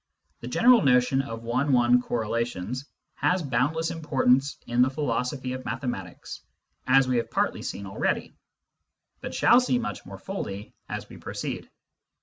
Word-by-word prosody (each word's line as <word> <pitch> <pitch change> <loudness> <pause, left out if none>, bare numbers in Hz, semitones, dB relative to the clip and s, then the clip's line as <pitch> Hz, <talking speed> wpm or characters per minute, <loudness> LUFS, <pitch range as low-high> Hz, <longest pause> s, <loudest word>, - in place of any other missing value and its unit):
The 120 - -8
general 235 - +5
notion 125 -1 +3
of 115 -4 -7
one 130 +5 +1
one 125 0 +5
correlations 115 +1 -3 0.2
has 180 -1 +1
boundless 150 +6 0
importance 140 -4 +2
in 120 +1 +1
the 130 - +5
philosophy 130 -1 -2
of 130 0 -6
mathematics, 115 -6 -5 0.5
as 135 0 +5
we 125 -1 +1
have 120 - -1
partly - - 0
seen 100 - -5
already, 95 - -2 0.9
but - - -6
shall 240 - +6
see 250 0 +1
much 240 - -4
more - - -9
fully 105 - -6 0.2
as - - -5
we - - -12
proceed. - - -5
130 Hz, 145 wpm, -26 LUFS, 120-145 Hz, 0.9 s, shall